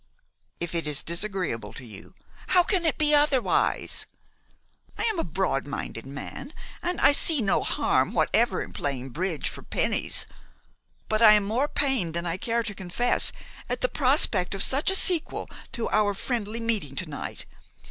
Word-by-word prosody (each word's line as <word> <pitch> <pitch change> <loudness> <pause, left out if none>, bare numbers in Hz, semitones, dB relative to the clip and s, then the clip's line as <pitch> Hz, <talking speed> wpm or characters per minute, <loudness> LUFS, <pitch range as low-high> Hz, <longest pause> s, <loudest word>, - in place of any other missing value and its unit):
"If 170 0 -3
it 165 -2 -1
is 150 -1 0
disagreeable 170 - -2
to 130 - -10
you 110 - -12
" - - -23
"How 360 - +7
can 355 -3 +1
it - - 0
be 300 -1 +4
otherwise? 290 -4 +2 0.9
I - - -2
am 435 -6 +1
a - - 0
broad 165 -5 -2
minded 135 -4 -6
man, 145 - -8 0.3
and 355 +1 -2
I - - +6
see 300 +1 +6
no 205 -5 +1
harm - - +1
whatever - - +2
in - - -11
playing 135 -2 -4
bridge 165 +1 -2
for - - -5
pennies; - - 0 0.8
but 215 +1 0
I 215 -2 +9
am 210 -1 +3
more 230 +8 0
pained 255 - -1
than 170 +1 -2
I 170 +1 -2
care 230 +4 -1
to 210 - -3
confess 195 +6 +1 0.4
at - - -2
the - - +2
prospect 250 - +2
of 195 - 0
such 280 +7 +1
a 385 - +2
sequel 355 -4 0 0.3
to 235 - -3
our 205 -1 +2
friendly 230 -1 -3
meeting 215 - -1
to 185 - -1
night. 145 - -7
210 Hz, 175 wpm, -26 LUFS, 170-270 Hz, 0.9 s, I